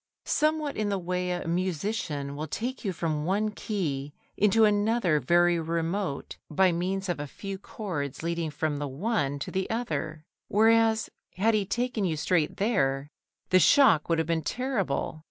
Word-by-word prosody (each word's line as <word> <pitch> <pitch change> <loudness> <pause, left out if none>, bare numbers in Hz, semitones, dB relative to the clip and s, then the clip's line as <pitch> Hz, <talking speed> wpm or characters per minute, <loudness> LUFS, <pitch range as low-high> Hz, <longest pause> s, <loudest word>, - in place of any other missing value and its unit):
Somewhat 305 -1 +1
in 210 -1 0
the 200 - 0
way 180 0 -2
a 175 -2 -3
musician 170 -4 -2
will 155 +2 -4
take 245 - -4
you 200 - 0
from 160 -3 -2
one 205 +5 0
key 150 -11 -3 0.2
into 215 +2 +4
another 205 -5 +2
very 175 +1 +3
remote 165 0 -2
by 185 +4 +3
means 190 +3 -2
of 175 -4 -2
a 145 - -4
few 195 +6 -7
chords 165 - -5
leading 170 -1 -1
from 150 0 -2
the 145 - -2
one 145 - -1
to 140 - -5
the 190 0 -2
other; 155 -9 -3 0.2
whereas, 225 +1 +3 0.2
had 220 +5 +2
he 205 -3 +1
taken 240 0 -1
you 165 -4 0
straight 160 0 +1
there, 140 - 0 0.4
the 185 - +6
shock 185 - +5
would 165 - +3
have 160 - +1
been 165 0 0
terrible. 200 - -2
180 Hz, 165 wpm, -28 LUFS, 155-215 Hz, 0.4 s, the